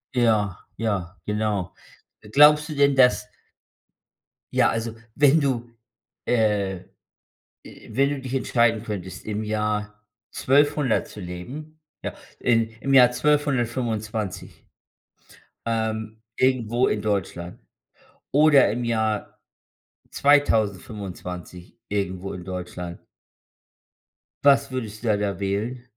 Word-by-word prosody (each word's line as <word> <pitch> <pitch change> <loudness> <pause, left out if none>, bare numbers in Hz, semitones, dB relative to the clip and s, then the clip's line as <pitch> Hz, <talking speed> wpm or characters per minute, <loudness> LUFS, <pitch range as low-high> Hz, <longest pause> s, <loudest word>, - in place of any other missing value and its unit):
Ja, 110 -6 +2 0.2
ja, 95 -5 -2
genau. 105 -3 -1 0.5
Äh, 105 - -14
glaubst 150 +4 +6
du 155 - -4
denn, 140 -1 +4
dass 125 -1 +4 1.3
ja, - - +4
also, 115 0 -2 0.2
wenn 145 +2 +5
du, 120 -4 -1 0.6
äh 105 -5 +1 0.8
äh, - - -14
wenn 135 +5 +2
du 145 -1 -3
dich 130 -1 -6
entscheiden 115 -4 +2
könntest, 95 -5 -6
im 105 0 -3
Jahr 105 0 -2 0.3
1200 145 -2 +2
zu - - -11
leben 130 - -8 0.2
ja, - - -3 0.3
im 115 -2 +2
im 135 0 0
Jahr 125 -2 +7
1225, 120 -8 -1 1.0
ähm, 110 -1 -2
irgendwo 125 -1 +2
in 105 - -1
Deutschland 95 -4 -3 0.7
oder 145 -4 +6
im 120 +3 -3
Jahr 110 -2 -1 0.7
2025 100 -8 0
irgendwo 95 -2 -3
in 90 - -7
Deutschland 90 -1 -7 1.4
was 140 -1 +4
würdest 110 -4 -5
da 110 - +3
da 100 -3 -2
wählen? 105 +6 -2
110 Hz, 105 wpm, -24 LUFS, 100-130 Hz, 1.4 s, Jahr